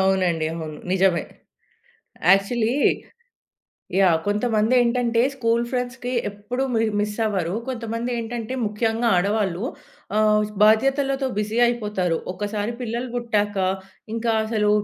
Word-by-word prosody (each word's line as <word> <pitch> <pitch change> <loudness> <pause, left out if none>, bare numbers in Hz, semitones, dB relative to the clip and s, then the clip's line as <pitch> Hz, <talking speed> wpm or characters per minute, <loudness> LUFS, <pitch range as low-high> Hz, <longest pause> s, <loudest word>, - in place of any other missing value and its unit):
అవునండి. 185 -4 +2
అవును. 155 -2 -6
నిజమే. 190 -3 +2 1.1
యాక్చువలీ. 220 +4 +2 1.2
యాహ్! 185 -4 +5
కొంతమంది 215 +2 +1
ఏంటంటే 235 -1 +2
స్కూలు 235 -2 +1
ఫ్రెండ్స్‌కి 250 0 -3 0.2
ఎప్పుడుూ 210 +6 -4
మి 225 - +2 0.2
మిసవ్వరు. 210 -4 -1
కొంతమంది 230 -1 -3
ఏంటంటే 230 +1 -4
ముఖ్యంగా 225 +2 0
ఆడవాళ్ళు 195 0 0 0.5
ఆహ్, 215 0 +4 0.2
బాధ్యతలతో 270 +5 +3
బిజీ 210 +2 -1
అయిపోతారు. 210 -8 0 0.2
ఒకసారి 205 +3 -3
పిల్లలు 240 +1 -3
పుట్టాక 210 -4 0 0.6
ఇంకా 230 0 0
అసలు 215 -1 +1
220 Hz, 100 wpm, -23 LUFS, 205-240 Hz, 1.2 s, యాహ్